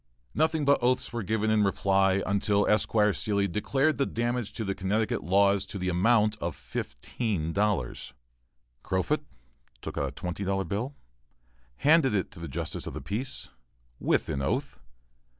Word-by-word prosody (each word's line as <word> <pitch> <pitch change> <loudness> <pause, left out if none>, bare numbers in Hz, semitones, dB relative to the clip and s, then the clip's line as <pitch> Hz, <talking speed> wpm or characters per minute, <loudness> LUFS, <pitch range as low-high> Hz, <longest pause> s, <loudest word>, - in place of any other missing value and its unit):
Nothing 160 0 +1
but 140 -1 +4
oaths 125 0 +1
were 120 - -2
given 110 +2 0
in 110 -1 +4
reply, 95 0 +2
until 100 +1 +2
Esquire 105 0 +3
Seelye 100 -1 0
declared 135 - +1
the 140 - +2
damage 120 -1 -2
to 110 - -4
the 100 - -1
Connecticut 100 +3 -1
laws 100 +3 +3
to 95 -2 -4
amount 105 +4 +3
to - - -2
fifteen 95 -10 -3
dollars. 100 - -1 0.7
Crofut 95 +3 0 0.6
took - - -5
out 70 - 0
a - - -5
twenty 90 +6 -5
dollar 95 0 0
bill, 105 - -3 0.6
and - - -26
handed 150 -6 +5
it 95 - -1
to - - -13
the 85 - -5
justice 65 - -4
of - - -6
the - - -3
peace, 120 +7 -4 0.5
with - - +1
an 70 - -2
oath. 70 - -2
100 Hz, 160 wpm, -28 LUFS, 95-115 Hz, 0.7 s, handed